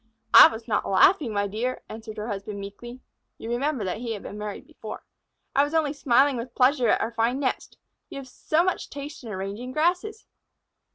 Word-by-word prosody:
"I -, -, +11 dB
was 225 Hz, +1 st, -8 dB
not 220 Hz, -, -1 dB
laughing, 255 Hz, -, +4 dB
my 205 Hz, -1 st, 0 dB
dear," 225 Hz, +6 st, -3 dB
answered 220 Hz, 0 st, -9 dB
her 210 Hz, +1 st, -4 dB
husband 200 Hz, -1 st, -5 dB
meekly 240 Hz, +6 st, -9 dB, 0.4 s
(you 225 Hz, -, -6 dB
remember 265 Hz, 0 st, -1 dB
that 185 Hz, +2 st, -3 dB
he 235 Hz, -1 st, -3 dB
had 205 Hz, -, -8 dB
been -, -, -8 dB
married 210 Hz, -1 st, -6 dB
before). -, -, -9 dB, 0.5 s
"I 280 Hz, -, +5 dB
was 290 Hz, +3 st, -3 dB
only 305 Hz, -3 st, +1 dB
smiling 275 Hz, -1 st, +3 dB
with 235 Hz, +1 st, -7 dB
pleasure 255 Hz, -1 st, +3 dB
at -, -, +3 dB
our 225 Hz, -, -2 dB
fine 235 Hz, +3 st, 0 dB
nest. 265 Hz, -3 st, -3 dB, 0.3 s
You -, -, -8 dB
have 275 Hz, -1 st, -8 dB
so 310 Hz, +5 st, 0 dB
much 370 Hz, 0 st, -2 dB
taste 285 Hz, +1 st, -8 dB
in 230 Hz, -, -8 dB
arranging 200 Hz, +6 st, -5 dB
grasses!" 360 Hz, +8 st, 0 dB
240 Hz, 195 wpm, -25 LUFS, 215-285 Hz, 0.5 s, I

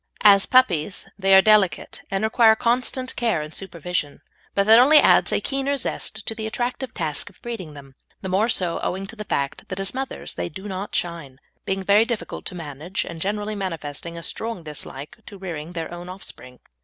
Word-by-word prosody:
As 200 Hz, -2 st, +7 dB
puppies 195 Hz, -9 st, +3 dB
they 195 Hz, 0 st, +5 dB
are 190 Hz, -, +8 dB
delicate, 215 Hz, -4 st, +3 dB
and 195 Hz, +1 st, -1 dB
require 220 Hz, 0 st, +5 dB
constant 255 Hz, +3 st, 0 dB
care 225 Hz, -10 st, 0 dB
and 155 Hz, +1 st, -9 dB
supervision; 170 Hz, -5 st, -3 dB, 0.3 s
but 200 Hz, -, +3 dB
that 220 Hz, +2 st, +8 dB
only 285 Hz, +5 st, +7 dB
adds -, -, +6 dB
a -, -, +2 dB
keener 275 Hz, 0 st, -1 dB
zest 215 Hz, -4 st, -4 dB
to -, -, -1 dB
the 220 Hz, 0 st, -4 dB
attractive 245 Hz, +2 st, -3 dB
task 155 Hz, -6 st, -1 dB
of -, -, -20 dB
breeding 190 Hz, -11 st, -6 dB
them, 135 Hz, -1 st, -12 dB, 0.3 s
the -, -, -5 dB
more 195 Hz, +5 st, +2 dB
so 180 Hz, -6 st, 0 dB
owing 190 Hz, +2 st, -3 dB
to 215 Hz, -, -10 dB
the 210 Hz, -1 st, -7 dB
fact 140 Hz, -6 st, -2 dB
that 190 Hz, -, -5 dB
as 195 Hz, 0 st, +1 dB
mothers 265 Hz, +1 st, -5 dB
they 85 Hz, 0 st, -3 dB
do 190 Hz, +2 st, -8 dB
not 195 Hz, +1 st, -5 dB
shine, 165 Hz, -7 st, -3 dB, 0.3 s
being 195 Hz, 0 st, -1 dB
very 205 Hz, +3 st, +5 dB
difficult 235 Hz, -3 st, -4 dB
to 185 Hz, -, -5 dB
manage, 160 Hz, +3 st, -4 dB
and 165 Hz, -1 st, -8 dB
generally 210 Hz, +3 st, -2 dB
manifesting 170 Hz, -4 st, -5 dB
a 170 Hz, -, -7 dB
strong 225 Hz, -3 st, -4 dB
dislike 150 Hz, -, -7 dB
to 200 Hz, -, -10 dB
rearing 170 Hz, -3 st, -6 dB
their 165 Hz, 0 st, -5 dB
own 175 Hz, +1 st, -8 dB
offspring. 125 Hz, -9 st, -9 dB
195 Hz, 195 wpm, -23 LUFS, 170-220 Hz, 0.3 s, are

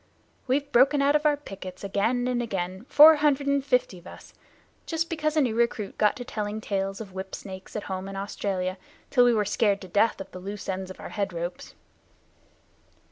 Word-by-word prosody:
We've 280 Hz, +2 st, 0 dB
broken 270 Hz, +4 st, +5 dB
out 285 Hz, +1 st, +3 dB
of 300 Hz, 0 st, +3 dB
our 295 Hz, -1 st, +2 dB
pickets, 190 Hz, -9 st, -9 dB
again 225 Hz, +5 st, 0 dB
and 245 Hz, -1 st, 0 dB
again, 190 Hz, -2 st, -4 dB
four 310 Hz, +1 st, +9 dB
hundred 290 Hz, -1 st, +2 dB
and 280 Hz, -1 st, +1 dB
fifty 250 Hz, -9 st, 0 dB
of 175 Hz, -, -15 dB
us, -, -, -13 dB, 0.5 s
just 330 Hz, +1 st, -2 dB
because 305 Hz, -1 st, -1 dB
a -, -, +5 dB
new 245 Hz, -5 st, +1 dB
recruit 230 Hz, -3 st, -1 dB
got 210 Hz, -1 st, +3 dB
to 245 Hz, -, -7 dB
telling 215 Hz, -4 st, -4 dB
tales 195 Hz, -1 st, -3 dB
of 195 Hz, -4 st, -9 dB
whip 190 Hz, 0 st, -6 dB
snakes 190 Hz, -1 st, -10 dB
at 210 Hz, -, -3 dB
home 190 Hz, 0 st, -5 dB
in 195 Hz, -, -7 dB
Australia 195 Hz, -1 st, -3 dB, 0.3 s
till 245 Hz, -3 st, +5 dB
we 240 Hz, -, +5 dB
were 210 Hz, -1 st, +1 dB
scared 205 Hz, 0 st, +1 dB
to 190 Hz, -, -9 dB
death 205 Hz, +5 st, +2 dB
of 195 Hz, -, -8 dB
the 185 Hz, -, -8 dB
loose 200 Hz, +2 st, -7 dB
ends 190 Hz, 0 st, -3 dB
of 185 Hz, -, -10 dB
our -, -, -8 dB
head 200 Hz, -2 st, -2 dB
ropes." 170 Hz, +1 st, -6 dB
210 Hz, 205 wpm, -26 LUFS, 190-270 Hz, 0.5 s, four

